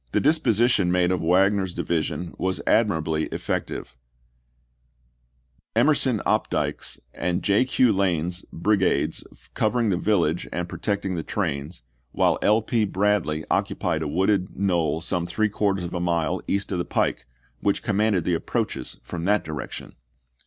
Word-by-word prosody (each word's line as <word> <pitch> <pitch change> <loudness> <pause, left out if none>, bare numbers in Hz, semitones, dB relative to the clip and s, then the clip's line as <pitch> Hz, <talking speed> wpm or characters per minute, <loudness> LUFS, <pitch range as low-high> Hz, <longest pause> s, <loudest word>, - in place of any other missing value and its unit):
The - - +3
disposition 120 - +3
made 90 0 +2
of 90 - 0
Wagner's 95 +2 +2
division 85 +1 -2
was 95 0 -1
admirably 80 -8 +2
effective; - - -4 1.8
Emerson 125 -2 +3
Opdycke's - - -1
and 90 +1 -2
J. 100 +5 +3
Q. 125 -3 +3
Lane's 90 -2 0
brigades 100 +2 +1 0.3
covering 110 0 +1
the 90 - +1
village 85 -4 +1
and 90 0 -3
protecting 100 +1 -2
the 85 - -2
trains, 80 - -3 0.3
while - - +2
L. 105 +1 +3
P. 115 0 +1
Bradley 95 -6 0
occupied 80 -3 0
a 80 - -2
wooded 95 +4 0
knoll 85 -5 +1
some 85 +1 -2
three 110 +5 +1
quarters 100 -2 0
of 85 - -5
a 90 - -2
mile 85 -3 0
east 100 +1 -1
of 90 - -1
the - - 0
pike, 65 - -1 0.3
which 100 - 0
commanded 105 -3 +1
the 90 - 0
approaches 85 - -2
from 85 -1 -5
that 105 +2 +2
direc 75 -4 -5
tion. - - -8
95 Hz, 145 wpm, -24 LUFS, 85-105 Hz, 1.8 s, The